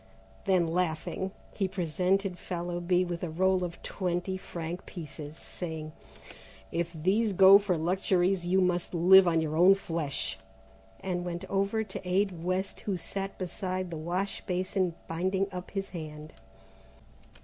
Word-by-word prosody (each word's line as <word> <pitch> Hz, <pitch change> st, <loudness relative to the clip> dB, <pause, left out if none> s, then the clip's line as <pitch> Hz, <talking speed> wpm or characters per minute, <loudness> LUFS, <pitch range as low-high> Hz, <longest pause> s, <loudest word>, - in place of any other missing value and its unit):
Then 185 Hz, -3 st, +3 dB
laughing, 170 Hz, +2 st, -1 dB, 0.3 s
he 195 Hz, -, +1 dB
presented 185 Hz, +2 st, 0 dB
Fallowby 175 Hz, 0 st, 0 dB
with 175 Hz, -1 st, -4 dB
a 175 Hz, -, -2 dB
roll 185 Hz, +3 st, +2 dB
of 175 Hz, -1 st, -5 dB
twenty 180 Hz, 0 st, -2 dB
franc 175 Hz, -1 st, -6 dB
pieces 155 Hz, -3 st, -8 dB
saying: 160 Hz, -3 st, -6 dB, 0.8 s
"If 170 Hz, 0 st, -1 dB
these 195 Hz, +7 st, +1 dB
go 195 Hz, +1 st, +9 dB
for 195 Hz, -4 st, 0 dB
luxuries 180 Hz, +2 st, +1 dB
you 185 Hz, +2 st, +3 dB
must 180 Hz, -1 st, 0 dB
live 185 Hz, +2 st, +8 dB
on 165 Hz, -1 st, +3 dB
your 155 Hz, -1 st, -2 dB
own 180 Hz, +4 st, +7 dB
flesh," 150 Hz, -, -3 dB, 0.6 s
and 180 Hz, -2 st, -2 dB
went 175 Hz, +1 st, -4 dB
over 200 Hz, +3 st, +1 dB
to 215 Hz, -, -7 dB
aid 185 Hz, -2 st, +1 dB
West, 185 Hz, +2 st, -1 dB
who 195 Hz, -3 st, -2 dB
sat 195 Hz, +3 st, -4 dB
beside 185 Hz, 0 st, -3 dB
the -, -, -4 dB
wash 180 Hz, +5 st, -2 dB
basin 185 Hz, -1 st, 0 dB
binding 185 Hz, +4 st, 0 dB
up 180 Hz, -1 st, -6 dB
his 195 Hz, -1 st, -4 dB
hand. 155 Hz, -3 st, -8 dB
180 Hz, 140 wpm, -29 LUFS, 170-190 Hz, 0.8 s, go